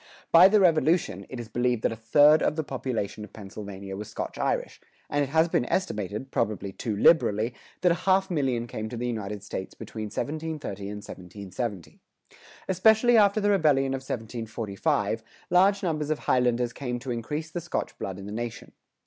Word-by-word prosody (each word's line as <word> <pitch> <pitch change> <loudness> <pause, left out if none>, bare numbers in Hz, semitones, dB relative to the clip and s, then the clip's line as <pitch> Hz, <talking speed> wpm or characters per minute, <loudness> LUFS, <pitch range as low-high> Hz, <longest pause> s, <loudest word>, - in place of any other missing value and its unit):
By 170 +3 +9
the 210 +2 +4
Revolution, 160 - +2
it 130 - -6
is 120 - -6
believed 120 0 0
that - - +2
a - - -4
third 145 +7 +5
of - - +1
the 160 - -1
population 120 -6 -3
of 105 - -11
Pennsylvania 100 -1 -8
was 105 +2 -7
Scotch - - -5
Irish; - - -1 0.3
and 145 - +1
it 135 - -3
has 160 +3 +3
been 165 - +1
estimated, 110 - -2
probably 100 -2 -1
too 105 +2 -3
liberally, 115 -5 +4 0.3
that 180 - +4
a 170 - -1
half 190 0 +3
million 130 -7 0
came 110 -2 -5
to 120 - -6
the 120 - -3
United 105 -4 -4
States 95 - -6
between 110 -1 -6
1730 145 -4 -4
and 105 0 -7
1770.[103:2] 95 +2 -6 0.7
Especially 220 +6 +4
after 205 -1 +5
the 205 0 +2
Rebellion 145 -8 +3
of 135 - -2
1745, 110 -4 -2 0.3
large 195 +3 +4
numbers 155 -4 -1
of 155 - +1
Highlanders 125 -2 +1
came 125 -3 -3
to 125 +1 -5
increase 150 +7 -4
the 175 - -4
Scotch 170 - -3
blood 95 -1 -4
in 100 - -8
the 105 - -7
nation. 115 +1 -5
125 Hz, 180 wpm, -27 LUFS, 105-160 Hz, 0.7 s, By